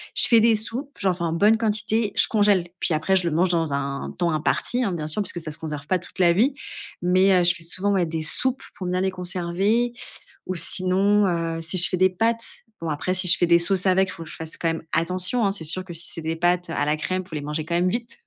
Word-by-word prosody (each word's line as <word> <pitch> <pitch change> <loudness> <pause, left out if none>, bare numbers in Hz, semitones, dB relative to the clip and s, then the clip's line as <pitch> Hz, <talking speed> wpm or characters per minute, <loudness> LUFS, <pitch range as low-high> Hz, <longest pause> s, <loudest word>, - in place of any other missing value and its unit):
je - - +9
fais 230 -2 +5
des 230 0 +4
soupes, 250 +6 -3
j'en 190 -2 +1
fais 170 - -6
en 165 - -1
bonne 210 +6 +3
quantité, 220 -1 -1
je - - +5
congèle, 205 -5 +2
puis - - +2
après 160 +5 0
je 180 -2 +2
le 165 - -2
mange 180 +4 +2
dans 165 -4 0
un 140 0 -4
temps 175 -1 +1
imparti, 170 +10 0
hein, 210 - -1
bien 160 -4 -4
sûr, 180 +7 +2
puisque 180 -2 -5
ça 160 - -6
se 150 - -3
conserve 150 -2 -7
pas 185 - +1
toute 180 +1 -12
la 175 -2 +5
vie. 240 +10 +2 0.5
Mais 185 +2 +3
heu, - - +1
je 175 0 +3
fais 170 - -7
souvent, 185 +4 -1
ouais, 185 -3 +1
des 160 -1 -4
soupes 260 +12 +2
pour 185 - -7
bien 180 +1 -1
les 190 0 0
conserver. 185 +6 -1 0.5
Ou 185 - -3
sinon, 190 +4 +3
heu, 165 -2 -2
si 165 +3 0
je 175 - +6
fais 185 - -2
des 185 +1 +4
pâtes, 230 +5 0 0.4
bon, 165 - -4
après, 155 +5 -2
si 185 0 +3
je - - +8
fais 175 - +2
des 170 0 +5
sauces 185 +2 +2
avec, 190 0 +2
faut 165 - -9
que 160 - -12
je - - -8
fasse 160 0 -8
quand 165 - -2
même 165 0 -2
attention, 185 +7 -1
hein. 195 - +1
C'est 195 -4 -5
sûr 175 +4 -4
que 175 - -9
si 165 +1 -5
c'est 165 - -6
des 160 +1 -3
pâtes 175 +1 0
à 165 - -1
la 150 +1 +1
crème, 185 +4 -3
faut 175 - -13
les 150 - -4
mangez 150 +2 -4
quand 170 +1 -2
même 180 +1 +1
vite 235 - -5
180 Hz, 275 wpm, -23 LUFS, 165-200 Hz, 0.5 s, je